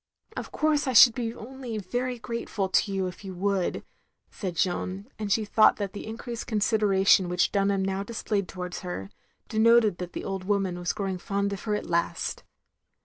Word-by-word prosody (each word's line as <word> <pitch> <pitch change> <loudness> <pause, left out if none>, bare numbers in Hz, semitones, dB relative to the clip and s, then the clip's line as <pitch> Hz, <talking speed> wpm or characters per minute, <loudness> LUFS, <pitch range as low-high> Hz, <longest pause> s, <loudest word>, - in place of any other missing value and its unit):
" 440 - -27
"Of - - -6
course 305 -2 +1
I 260 - 0
should 240 0 +9
be 230 -1 -2
only 245 -1 -7
very 245 +5 -2
grateful 225 -3 -3
to 200 - +2
you 195 -1 0
if 180 +1 -7
you 190 -2 -7
would, 195 0 -1 0.2
" - - -46
said 185 -4 -5
Jeanne; 185 +3 -1
and 210 -2 -3
she 215 +1 +2
thought 215 +1 +5
that 200 -2 -4
the 210 - -7
increased 230 +1 -6
consideration 200 -4 +3
which 180 0 +2
Dunham 195 -1 +1
now 195 0 -1
displayed 205 -2 -2
towards 180 -1 -6
her, 175 - -6 0.4
denoted 225 -3 +4
that 180 -1 -6
the - - -5
old 195 -1 -3
woman 195 -3 0
was 175 0 -1
growing 195 -3 -3
fond 200 +2 -1
of 195 - -7
her 210 -1 +1
at - - -4
last. 170 0 -1
200 Hz, 195 wpm, -27 LUFS, 190-225 Hz, 0.4 s, should